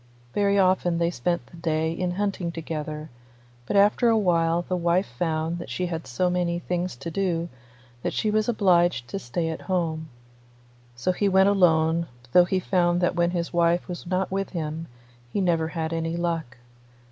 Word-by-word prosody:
Very 200 -1 +2
often 185 -2 +3
they 170 0 +1
spent 170 +4 -1
the 170 - -15
day 160 -1 0
in 175 +1 -2
hunting 195 -3 -2
together, 155 -2 -5 0.6
but - - -1
after 205 +4 +4
a 225 - +4
while 170 -4 +2
the 185 - -2
wife 175 +2 +2
found 160 +5 -2
that - - -7
she 185 - -2
had 165 -2 -4
so 130 +9 0
many 180 -1 0
things 180 -1 -3
to 135 +7 -6
do 175 -2 -1 0.5
that - - -1
she 215 - 0
was 215 +1 +1
obliged 175 - +3
to 195 - -3
stay 165 +2 -2
at 160 - -5
home; 160 -4 -1 0.9
so 125 +10 0
he 200 +2 +1
went 190 +1 +5
alone, 165 -3 +3 0.2
though 180 +4 +7
he 185 +1 0
found 175 -2 +2
that 175 - +1
when 175 -1 +2
his 175 -1 -3
wife 170 0 +2
was 175 0 -7
not 185 +1 -1
with 195 0 -1
him 160 +1 -4 0.4
he - - -1
never 170 -4 +1
had 160 0 -3
any 165 +1 -2
luck. 165 -7 -2
175 Hz, 180 wpm, -25 LUFS, 165-185 Hz, 0.9 s, though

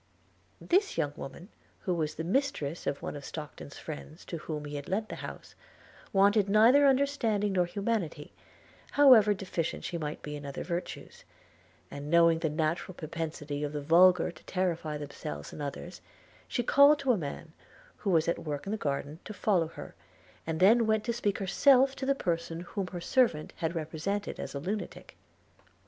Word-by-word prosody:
This 390 +3 +1
young 145 -1 0
woman, 170 +8 -9 0.3
who 185 - -1
was 155 -3 -2
the 160 - -4
mistress 170 - -1
of 140 - -2
one - - -4
of 145 - -8
Stockton's 145 -1 -8
friends 155 +1 -9
to 170 - -5
whom 150 -1 -5
he 145 0 -6
had 145 -1 -6
lent 215 +3 -1
the - - -6
house, - - -9 0.6
wanted 200 +1 +4
neither 235 +8 +6
understanding 255 -7 +1
nor 180 -2 +2
humanity, 180 -5 -3 0.6
however 240 -8 +7
deficient 180 -4 -3
she 170 - -4
might 150 -1 -5
be 150 0 -5
in 145 - -8
other 140 -1 -5
virtues; 175 +1 -6 0.7
and 140 +1 -7
knowing 170 0 +5
the 160 - 0
natural 160 +4 -2
propensity 155 -3 -5
of 145 0 -3
the 150 - -2
vulgar 175 +3 +5
to 155 - -18
terrify 170 -5 -1
themselves 105 - -7
and - - -7
others, 145 +5 -6 0.5
she 245 - -1
called 280 +5 +6
to 275 -3 +1
a - - +4
man, 160 -1 -6 0.4
who 205 - -3
was 165 -3 +3
at 170 - 0
work 145 -2 -5
in 195 - -4
the 220 - -1
garden, 145 -2 -3
to 215 - -8
follow 185 -4 +2
her, 165 - -10 0.5
and 160 -1 -2
then 225 +4 +5
went 220 -1 +2
to 235 - -1
speak 210 -4 -1
herself 265 +7 +4
to 265 - -4
the 275 - +3
person 170 -6 -2
whom 190 +1 -4
her 180 -1 -6
servant 220 -8 +1
had 165 +1 -2
represented 165 +6 -3
as - - -6
a - - -2
lunatic. 200 +8 -5
175 Hz, 180 wpm, -30 LUFS, 155-215 Hz, 0.7 s, however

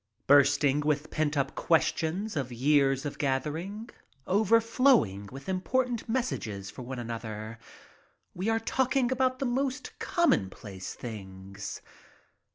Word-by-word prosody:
Bursting 145 0 +5
with 150 0 -1
pent 155 -1 0
up 140 -1 0
questions 175 +5 +1
of 135 -4 -2
years 135 +2 +2
of 145 - -5
gathering, 160 - -2 0.3
overflowing 220 - +3
with 135 +1 -10
important 235 +6 -1
messages 110 - -2
for - - -9
one 130 +1 -6
another, 115 -1 -6 0.7
we 190 +5 -2
are 225 0 +2
talking 260 +2 +1
about 255 0 +1
the 270 - -2
most 265 +2 -1
commonplace 100 - -1
things. 95 -3 -8
150 Hz, 115 wpm, -29 LUFS, -, 0.7 s, Bursting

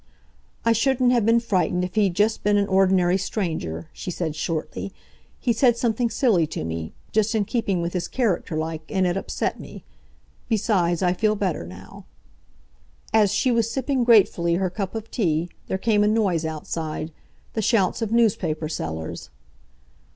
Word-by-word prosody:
"I 230 - +4
shouldn't 250 +2 +3
have 235 -4 +2
been 230 +1 +5
frightened 185 -5 0
if 180 0 -4
he'd 200 -5 +2
just 210 +3 +2
been 205 0 +3
an 200 - +2
ordinary 190 -1 +3
stranger," 160 - -3
she - - -6
said 165 -3 -3
shortly. 160 +4 -3 0.5
"He 240 - +1
said 240 +1 +3
something 235 0 0
silly 205 - +2
to - - -5
me—just 85 - -2
in 210 -2 +1
keeping 195 -7 -1
with 170 - -3
his 180 -2 -2
character 200 -9 -1
like, 160 0 -3
and 190 -2 +1
it 175 0 +1
upset 195 - -2
me. - - -10 0.7
Besides, 190 -6 +1
I 180 -1 +3
feel 215 +3 +1
better 180 - -2
now." 90 +2 -12 1.1
As 210 -3 +4
she 255 - +2
was 230 -1 +1
sipping 265 +1 0
gratefully 190 -7 +4
her 185 0 0
cup 195 +1 -4
of 225 0 -6
tea, 170 -5 0 0.2
there 190 - -1
came 210 +1 +2
a - - +3
noise 200 -7 +1
outside, 155 0 -4 0.4
the 220 - -1
shouts 205 -1 +2
of 225 -2 -2
newspaper 185 -9 +1
sellers. 80 - -5
195 Hz, 165 wpm, -24 LUFS, 170-225 Hz, 1.1 s, been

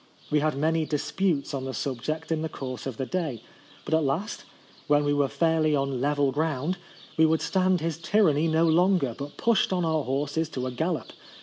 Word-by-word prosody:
We 150 - +4
had 150 -1 0
many 160 +2 +1
disputes 150 +1 -1
on 135 -1 -3
the 130 - -4
sub 130 -4 -3
ject 155 +5 -3
in 160 -1 0
the 160 - -2
course 130 -3 -6
of 130 -5 -5
the 130 - -2
day; 150 - -3 0.4
but - - -3
at 160 0 +3
last, 160 +10 -2 0.4
when 145 0 +4
we 145 - +2
were 145 -1 +2
fairly 160 0 +2
on 135 -2 -1
level 145 -1 +2
ground, 155 +4 -1 0.4
we 160 - +6
would 160 0 +1
stand 185 -2 +2
his 165 -1 -2
tyranny 165 -4 +3
no 160 +1 +3
longer, 170 -5 +3
but 145 +1 -8
pushed 230 -5 +2
on 180 -2 +1
our 160 -2 +1
horses 145 +4 -1
to 130 -5 -4
a 130 - -2
gallop. 160 +6 -2
155 Hz, 205 wpm, -27 LUFS, 140-165 Hz, 0.4 s, we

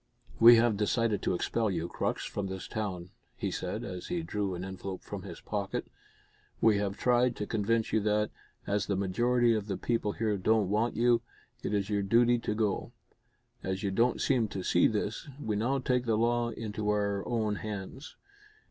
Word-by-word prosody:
"We 120 +1 +10
have 115 -2 +3
decided 105 0 +1
to - - 0
expel 110 +4 0
you, 85 -3 -2
Crux, - - -2
from 100 -1 -3
this 95 0 -6
town," 95 -5 -4 0.3
he - - -2
said, - - -3
as 90 -1 -6
he 175 -1 -2
drew 100 - -2
an 90 +1 -5
envelope 95 0 -6
from - - -6
his - - -9
pocket. - - -3 0.7
"We 110 -3 +4
have 100 -1 -2
tried 125 0 +3
to 105 - -3
convince 110 +1 0
you 110 - +4
that, 105 0 +1 0.3
as 100 0 0
the 100 - 0
majority 120 +5 +2
of 105 -2 -2
the 100 -3 -2
people 115 -3 -1
here 110 -2 0
don't 105 0 +2
want 110 +3 +1
you, 120 0 +3 0.4
it - - -3
is 100 0 -1
your 100 -1 +1
duty 120 +4 +4
to 105 -2 -2
go. 105 -3 -1 0.7
As 95 +1 -3
you 100 - 0
don't 120 +5 +2
seem 125 -5 +2
to 100 -3 -5
see 85 - +4
this, 110 +7 -3
we 110 -7 -2
now 120 +6 +1
take 125 -1 0
the 110 -2 +2
law 120 +1 +2
into 110 -2 -4
our 100 -1 0
own 110 -3 0
hands. 105 +7 -7
105 Hz, 190 wpm, -30 LUFS, 100-115 Hz, 0.7 s, We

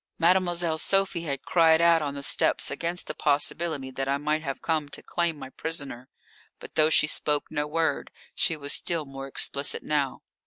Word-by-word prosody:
Mademoiselle 175 -2 +2
Sophie 195 -3 +1
had 140 -3 -4
cried 160 -2 +4
out 170 -1 +5
on 145 -2 -3
the 140 - -5
steps - - +2
against 170 +1 -3
the - - -5
possibility 145 -1 0
that 135 +1 -3
I 140 +1 +1
might 150 +2 -1
have 135 -3 -4
come 155 -3 -1
to - - -9
claim 170 -2 -1
my 130 -2 -9
prisoner. 140 -7 -6 0.5
But - - -11
though 155 0 +4
she 155 - +5
spoke 150 -1 -1
no 150 0 -1
word, 160 +1 -1 0.2
she 165 - 0
was 145 -1 -1
still 165 -3 -2
more 135 0 -8
explicit 140 +1 -1
now. 145 -3 -1
155 Hz, 185 wpm, -26 LUFS, 140-165 Hz, 0.5 s, out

